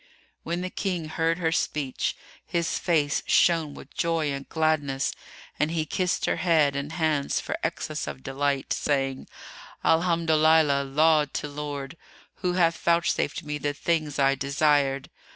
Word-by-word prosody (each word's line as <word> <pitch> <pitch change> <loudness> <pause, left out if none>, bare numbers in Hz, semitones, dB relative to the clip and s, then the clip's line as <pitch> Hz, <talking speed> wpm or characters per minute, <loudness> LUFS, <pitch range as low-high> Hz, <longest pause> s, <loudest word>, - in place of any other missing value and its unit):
When 170 +2 -3
the 185 0 -4
King 175 -5 -3
heard 165 +1 0
her 165 -2 0
speech, 145 -5 -1 0.3
his 170 -1 -1
face 150 -5 +1
shone 165 -4 +3
with 135 - -12
joy 165 -3 0
and 140 0 -6
gladness 150 -4 0 0.5
and 150 - +2
he 160 -1 -1
kissed 180 +3 -1
her - - 0
head 155 -6 +3
and 140 +3 -4
hands 155 -4 0
for - - -3
excess - - -3
of 70 -2 -7
delight, 140 - -1
saying, 135 -2 -1 0.6
"Alhamdolillah—laud 155 -3 +3
to - - -2
Lord—who 145 +4 -6
hath 170 -2 +2
vouchsafed 170 -3 +1
me 150 0 -4
the 145 0 -1
things 155 -2 -1
I 135 -1 +4
desired! 140 0 +1
150 Hz, 135 wpm, -26 LUFS, 140-165 Hz, 0.6 s, I